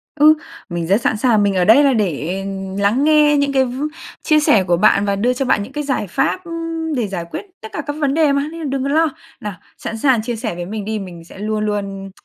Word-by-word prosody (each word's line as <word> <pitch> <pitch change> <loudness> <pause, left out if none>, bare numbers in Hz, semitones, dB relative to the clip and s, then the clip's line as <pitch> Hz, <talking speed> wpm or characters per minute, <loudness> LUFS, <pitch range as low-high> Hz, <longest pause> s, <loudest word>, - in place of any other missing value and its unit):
Ừ, 305 +1 +7 0.4
mình 170 -2 -3
rất 200 +6 +3
sẵn 225 - +1
sàng, 215 -2 +3
mình 200 -1 +1
ở 180 -1 +2
đây 230 +8 +7
là 275 -2 +4
để 180 -10 -1 0.5
lắng 210 +7 +2
nghe 300 -1 +5
những 285 -1 +1
cái 265 -1 +3
v 255 +3 -5 0.4
chia 310 -1 +4
sẻ 215 -10 +4
của 175 -1 +1
bạn 200 0 +4
và 200 -1 +1
đưa 235 +6 +1
cho 265 +2 -2
bạn 205 -4 +2
những 260 - -11
cái 295 +1 -3
giải 265 -7 -1
pháp, 370 - -1
ưm, 330 -1 -4
để 235 -4 -1
giải 180 -4 -4
quyết - - -5 0.2
tất 220 - -8
cả - - -3
các 290 - -3
vấn 280 -2 +2
đề 310 -1 +3
mà, 280 +1 +1
nên 330 - -8
là - - -4
đừng 270 -1 -2
có 275 - -1
lo. 315 +2 +3 0.3
Nào, 210 -1 -5 0.2
sẵn 225 - -5
sàng 250 -1 +3
chia 235 +2 -3
sẻ 220 -5 -4
với 175 0 -5
mình 210 +2 -5
đi, 220 0 -2
mình 175 -4 -9
sẽ 170 - -14
luôn 215 +1 -1
luôn 195 -2 -4
230 Hz, 265 wpm, -18 LUFS, 200-290 Hz, 0.5 s, Ừ